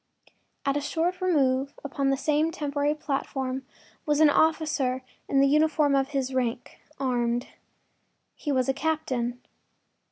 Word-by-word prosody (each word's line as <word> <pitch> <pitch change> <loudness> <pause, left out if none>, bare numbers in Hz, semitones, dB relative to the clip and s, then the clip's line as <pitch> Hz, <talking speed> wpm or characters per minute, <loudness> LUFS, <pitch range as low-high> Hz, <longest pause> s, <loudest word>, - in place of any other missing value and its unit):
At 275 - +1
a 290 - 0
short 335 +5 -1
remove 275 -6 +1
upon 275 -1 -1
the 270 - +2
same 305 +3 +1
temporary 290 -2 -1
platform 265 -3 -3 0.4
was 295 -1 +1
an 310 -2 +7
officer 295 -5 +1 0.3
in 275 - +4
the 275 - +5
uniform 300 0 +3
of 270 -1 +2
his 270 -2 -2
rank, 245 -2 -2 0.2
armed. 245 -2 0 0.8
He 295 - -4
was 255 -2 +1
a 270 - +2
captain. 260 -6 -2
275 Hz, 135 wpm, -27 LUFS, 260-300 Hz, 0.8 s, an